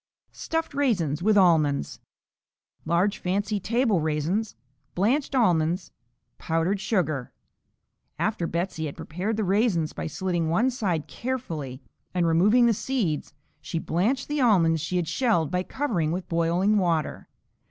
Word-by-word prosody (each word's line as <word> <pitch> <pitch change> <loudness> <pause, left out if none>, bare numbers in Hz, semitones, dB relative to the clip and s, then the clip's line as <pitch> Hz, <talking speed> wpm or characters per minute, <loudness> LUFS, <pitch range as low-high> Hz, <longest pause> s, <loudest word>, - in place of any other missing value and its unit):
Stuffed 325 -1 -3
Raisins 185 - 0
with 210 +2 +3
Almonds 155 - +3 0.9
Large 175 +5 +1
fancy 200 +3 -1
table 225 -2 +1
raisins. 160 +8 -1 0.4
Blanched 265 +9 +1
almonds. 175 -6 +2 0.5
Powdered 165 +5 0
sugar. 155 - -1 0.9
After 210 -6 -1
Betsey 170 -2 -2
had 140 - -8
prepared 190 +7 -3
the 220 - 0
raisins 195 -5 +1
by - - -4
slitting 175 0 -1
one 230 +11 +2
side 185 - -1
carefully 160 - -5 0.3
and 175 -1 +2
removing 200 +9 +4
the 235 - +4
seeds, 200 - -2 0.3
she 165 - -4
blanched 210 +12 0
the 295 -1 -1
almonds 165 -9 +4
she 165 +4 -3
had 175 -2 0
shelled 215 - +1
by 180 0 +1
covering 185 - -1
with 180 +2 -3
boiling 175 +5 +2
water. 165 -5 -1
180 Hz, 130 wpm, -26 LUFS, 165-220 Hz, 0.9 s, removing